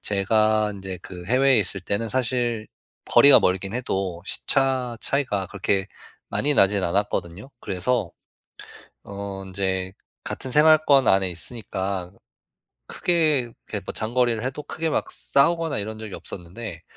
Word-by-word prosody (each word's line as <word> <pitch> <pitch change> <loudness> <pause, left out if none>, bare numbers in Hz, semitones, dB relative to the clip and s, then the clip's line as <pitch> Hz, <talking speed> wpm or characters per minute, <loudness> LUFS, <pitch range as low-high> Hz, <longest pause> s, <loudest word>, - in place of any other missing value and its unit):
제가 110 +1 +2
인제 95 -2 -7
그 90 -2 -9
해외에 130 +2 +4
있을 95 -1 -1
때는 100 +4 -2
사실 120 -2 -1 0.4
거리가 140 - +8
멀긴 95 +3 0
해도 95 -8 -3
시차 130 -1 +1
차이가 125 -9 -1
그렇게 100 0 -1 0.4
많이 145 +1 0
나진 100 -3 +3
않았거든요. 95 +3 -2
그래서 95 -1 -2 0.9
어 100 -1 -7
인제 95 0 -2 0.3
같은 130 - -5
생활권 150 -1 +5
안에 95 -1 +3
있으니까 95 0 -4 0.8
크게 160 -4 +2
이렇게 115 -3 -7
뭐 - - -4
장거리를 115 0 0
해도 135 +3 -4
크게 160 +2 -3
막 - - -1
싸우거나 165 +2 +1
이런 110 +1 -5
적이 110 -2 -8
없었는데 90 0 -8
110 Hz, 290 characters per minute, -23 LUFS, 95-130 Hz, 0.9 s, 거리가